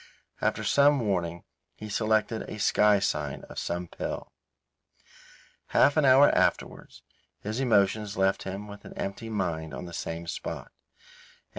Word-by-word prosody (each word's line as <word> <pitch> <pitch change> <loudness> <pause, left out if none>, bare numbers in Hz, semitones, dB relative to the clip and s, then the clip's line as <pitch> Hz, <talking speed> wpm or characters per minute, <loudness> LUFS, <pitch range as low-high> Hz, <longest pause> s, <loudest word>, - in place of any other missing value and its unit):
After - - 0
some 145 0 +4
warning, 85 -6 -2 0.3
he 110 - -8
selected 110 +1 0
a - - -6
sky 105 0 +4
sign 75 -8 -2
of - - -7
some 85 +1 -3
pill. - - -6 1.4
Half 145 - +4
an 155 -2 +3
hour 135 +2 +6
afterwards - - -1 0.4
his 110 +4 -4
emotions 105 -4 +2
left 95 0 +2
him 100 +2 -6
with 100 0 -11
an - - -11
emptied 100 +4 -5
mind 80 -8 -3
on 90 - -6
the 85 - -9
same 85 +1 -5
spot. 85 - -6
100 Hz, 140 wpm, -28 LUFS, 90-110 Hz, 1.4 s, hour